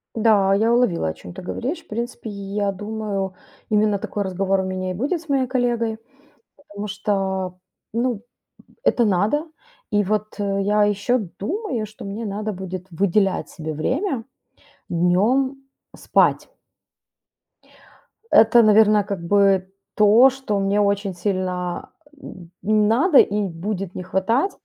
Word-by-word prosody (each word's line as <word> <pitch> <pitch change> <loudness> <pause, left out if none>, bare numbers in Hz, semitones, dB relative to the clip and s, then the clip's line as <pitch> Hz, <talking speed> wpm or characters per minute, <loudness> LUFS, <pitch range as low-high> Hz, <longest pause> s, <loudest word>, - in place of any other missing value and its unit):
Да, 210 -4 +4
я 225 +4 +3
уловила, 215 - +2
о - - -3
чём 90 +2 -12
ты - - -9
говоришь. 255 - -4
В - - -33
принципе, 235 0 -5
я 200 0 -2
думаю, 205 -1 -4 0.4
именно 210 -1 +2
такой 205 0 -3
разговор 190 +1 0
у - - -1
меня 185 0 -3
и - - -3
будет 290 - -2
с 320 - -19
моей 265 -2 +1
коллегой, 235 -3 0 0.6
потому 210 -7 -8
что, 190 -3 -2 0.3
ну, 235 -2 -1 0.6
это 240 - +3
надо. 210 - +1 0.4
И 205 -2 +2
вот 215 +2 -2
я 205 +1 +1
еще 205 +5 +1 0.2
думаю, 270 - -3
что 215 0 -12
мне 210 +3 -5
надо 210 +1 -3
будет 185 -1 -6
выделять 195 +2 +1
себе 155 -1 -6
время 260 - -1 0.6
днем 210 +11 +2 0.4
спать. - - +2 1.8
Это, 230 +2 +6
наверное, 215 -1 +5
как 195 -3 -5
бы 195 0 +3 0.2
то, 215 +5 +7
что 255 -6 -3
мне 195 +1 +1
очень 200 -1 +1
сильно, 180 -1 -3 0.3
м, 175 -2 -11
надо 225 - +3
и 205 +1 +3
будет 185 +2 -5
не 185 - -5
хватать 210 - 0
205 Hz, 135 wpm, -22 LUFS, 190-230 Hz, 1.8 s, то